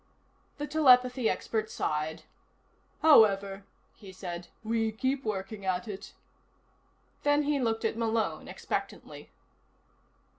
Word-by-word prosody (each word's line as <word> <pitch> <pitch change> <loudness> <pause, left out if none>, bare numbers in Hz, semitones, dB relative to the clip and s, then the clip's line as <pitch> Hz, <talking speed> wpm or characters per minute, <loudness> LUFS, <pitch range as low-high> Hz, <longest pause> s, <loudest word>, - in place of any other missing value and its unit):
The 295 - -3
telepathy 255 -5 +4
expert 220 -1 -2
sighed. 155 -5 -2 0.8
"However," 200 -9 +5 0.3
he 195 -3 -12
said, 175 -2 -7 0.2
"we 225 0 0
keep 260 +5 -1
working 205 -1 -4
at 185 0 -1
it." 200 -2 -8 1.1
Then 290 0 +3
he 290 -1 0
looked 225 -2 -1
at 225 - 0
Malone 225 -1 -1
expectantly. - - -5
220 Hz, 105 wpm, -29 LUFS, 195-255 Hz, 1.1 s, However